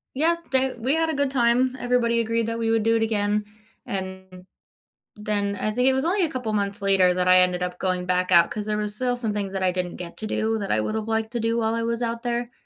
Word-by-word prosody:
Yet 330 +5 +2
they 265 -1 +2
we 260 +6 +1
had 325 0 +1
a - - 0
good 280 0 +1
time. 250 0 +2
Everybody 240 -2 +1
agreed 230 0 0
that 230 0 -2
we 225 -1 0
would 225 -1 +2
do 225 +1 +3
it 225 - +2
again. 210 -1 0 0.4
And, 190 -1 -7 0.7
then 205 -1 -1
I 215 - -1
think 250 +4 0
it - - +4
was 265 +1 0
only 360 +2 +1
a - - 0
couple 250 -5 -4
months 200 -1 -1
later 190 -2 +4
that 180 0 0
I 185 0 +7
ended 180 0 +2
up 180 0 -4
going 185 -1 -1
back 180 0 0
out 170 -1 +6
'cause 210 0 -4
there 210 - -1
was 210 0 -2
still 245 +1 0
some 225 -3 -2
things 200 -2 -3
that 190 - -3
I 185 - +3
didn't 180 -1 -3
get 170 -1 -8
to 215 - -5
do 220 +1 -1
that 200 -2 -3
I 110 - +2
would 215 - -2
have 220 0 -3
liked 220 0 -1
to 240 - -2
do 230 +1 0
while 225 -1 0
I 230 0 -1
was 235 +1 -1
out 230 +1 -3
there. 240 0 -2
220 Hz, 270 wpm, -24 LUFS, 195-240 Hz, 0.7 s, I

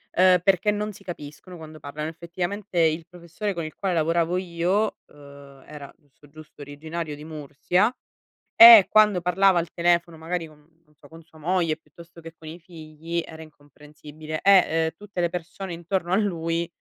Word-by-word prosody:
uhm, 185 0 +5
perché 195 +2 +2
non 210 +1 -3
si 195 - -16
capiscono 175 +1 -10
quando 155 -1 -12
parlano. 150 +2 -6
Effettivamente 175 +3 -5
il 160 0 +1
professore 180 +4 -6
con 170 -2 -5
il 155 - -8
quale 190 -2 -2
lavoravo 165 +2 0
io, 185 +4 -1
uhm, 140 -1 -16
era 145 -2 -11
giusto, 145 -1 -24
giusto 155 -1 -15
originario 155 +2 -7
di 150 - -12
Mursia 160 - -1 0.6
e 230 -4 +10
quando 210 -4 +4
parlava 180 +1 +3
al 170 - -4
telefono, 170 -1 0
magari 165 +1 -4
con, 155 -1 -19 0.3
non 150 - -30
so, 145 0 -19
con 165 +2 -14
sua 160 0 -21
moglie 165 0 -1
piuttosto 170 +2 -17
che 165 0 -11
con 160 - -14
i 160 +2 -8
figli, 165 0 -7
era 160 0 -11
incomprensibile 150 +1 -11
e 195 -2 +6
ehm 160 0 -1
tutte 205 -3 -6
le 170 - +1
persone 180 +2 -7
intorno 175 +1 -3
a - - +4
lui 170 -4 -1
170 Hz, 175 wpm, -24 LUFS, 155-180 Hz, 0.6 s, e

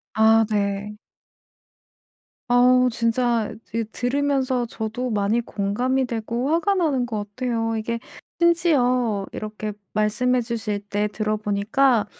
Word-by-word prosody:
아 220 0 +5
네. 205 0 -1 1.5
어우 250 +1 +5
진짜 230 -1 0
드 230 0 -3
들으면서 260 0 0
저도 225 +2 -4
많이 210 +2 +1
공감이 245 +5 -1
되고 235 +2 -3
화가 340 +5 +2
나는 290 -9 +1
것 210 -3 -4
같아요. 230 -3 -1
이게 230 +1 -3 0.4
심지어 255 - +2
이렇게 215 0 -5 0.2
말씀해 245 +4 +1
주실 225 -3 -3
때 205 +1 0
들어 215 +1 -2
보니까 215 +3 +2
230 Hz, 230 characters per minute, -23 LUFS, 215-255 Hz, 1.5 s, 아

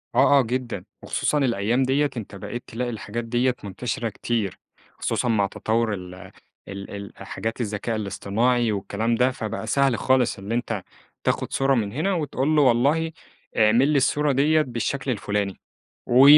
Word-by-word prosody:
آه، 140 - +6
آه - - +6
جدًا، 120 -5 -3 0.2
وخصوصًا 150 - 0
الأيام 120 -1 +2
ديّة 140 +3 +2
أنت 105 -3 -6
بقيت 105 +5 -6
تلاقي 125 +2 -3
الحاجات 115 +1 -4
ديّة 120 +2 +1
منتشرة 115 +4 -3
كتير، 110 -2 -2 0.3
خصوصًا - - -1
مع 105 -3 +3
تطوُّر 110 +1 0
ال 90 -1 -7 0.5
ال 100 0 -7
ال 100 -1 -7 0.2
حاجات 115 +2 -3
الذكاء 110 +1 -2
الاصطناعي 110 +3 +1
والكلام 105 +3 -1
ده، 125 +2 +3
فبقى 110 -4 -4
سهل 135 -4 +3
خالص 130 -4 +2
اللي 100 +4 -3
أنت 115 -5 -2 0.4
تاخد - - 0
صورة 135 0 +3
من 105 -4 0
هنا، 160 - 0
وتقول 150 -3 0
له 150 - +5
والله 140 +6 +3 0.5
اعمل 115 +5 +5
لي 150 - +3
الصورة 145 +2 +2
ديّة 150 +4 +4
بالشكل 130 +1 -2
الفلاني، 105 -3 -2 0.5
و 125 +3 +6
120 Hz, 160 wpm, -24 LUFS, 105-135 Hz, 0.5 s, آه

